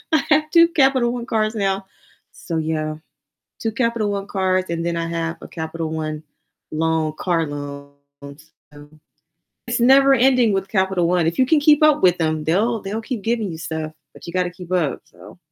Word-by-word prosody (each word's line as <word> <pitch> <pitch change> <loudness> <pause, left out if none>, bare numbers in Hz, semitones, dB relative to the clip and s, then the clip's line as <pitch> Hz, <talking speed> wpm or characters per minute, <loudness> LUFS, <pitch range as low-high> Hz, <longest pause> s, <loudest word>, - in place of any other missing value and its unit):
I 310 -3 +4
have 305 0 +3
2 335 0 +6
Capital 265 -6 +2
One 240 -1 -5
cards 215 -1 0
now, 195 -2 -1 0.5
so 165 - -6
yeah. 155 -1 -2 0.6
2 225 - -2
Capital 230 -3 0
One 200 0 -4
cards, 185 -2 0
and 170 0 -2
then 170 0 -1
I 165 0 -2
have 165 0 -3
a - - -9
Capital 160 0 -5
One 155 -1 -4 0.5
loan 160 0 0
car 170 -3 0
loan, 140 -1 -7 0.8
so 145 0 -14 0.8
it's 240 0 0
never 270 +2 +6
ending 255 -3 +3
with 195 0 -2
Capital 190 -3 +1
One. 175 -2 +2
If 170 - -3
you 260 - +4
can 300 +2 +3
keep 300 +1 +4
up 305 -7 +4
with 180 -1 +4
them, 155 -1 -1
they'll 215 +7 +1
they'll 205 +3 -4
keep 230 -4 -5
giving 225 -3 -1
you 160 - -8
stuff, 160 -1 -5 0.2
but - - -14
you 170 - -7
gotta 180 -1 0
keep 180 0 -10
up, 160 -7 0
so - - -16
185 Hz, 190 wpm, -21 LUFS, 160-235 Hz, 0.8 s, 2